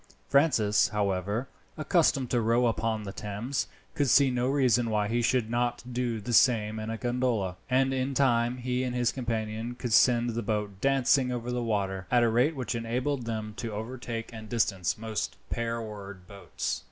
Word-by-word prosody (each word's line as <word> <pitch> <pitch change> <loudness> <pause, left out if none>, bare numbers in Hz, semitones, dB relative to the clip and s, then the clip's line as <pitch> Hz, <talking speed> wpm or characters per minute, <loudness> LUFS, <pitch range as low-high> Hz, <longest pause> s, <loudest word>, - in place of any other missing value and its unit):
Francis, 140 -8 +3
however, 100 +2 -1 0.3
accustomed 155 -4 +2
to 120 - +2
row 115 +2 +2
upon 115 -1 0
the 100 -1 -6
Thames, 105 +7 -3 0.3
could 145 -3 +1
see 140 +2 +5
no 125 0 0
reason 125 -4 +2
why 105 -1 +1
he 120 +2 0
should 120 -1 +1
not 120 +1 -1
do 120 -2 -1
the 120 +3 -4
same 110 -3 +3
in 110 0 -5
a 115 - -3
gondola, 120 -6 -1
and 135 +1 +2
in 130 +1 -1
time 120 -2 +2
he 125 0 -1
and 125 -1 -2
his 120 -1 +2
companion 115 -1 -3
could 120 -2 -3
send 120 0 +4
the 115 +1 -2
boat 105 -3 -3
dancing 135 -1 +3
over 120 0 -3
the 125 0 -1
water, 95 -5 -2
at 120 -1 +4
a 115 - +3
rate 125 +8 +2
which 130 -2 -3
enabled 120 +3 -2
them 110 -2 -4
to 115 -2 -4
overtake 115 +1 -5
and 110 -1 -9
distance 100 -6 0
most 110 -2 -4
pair 115 0 -1
oared 100 -4 -8
boats. 100 -9 -4
115 Hz, 180 wpm, -28 LUFS, 110-125 Hz, 0.3 s, see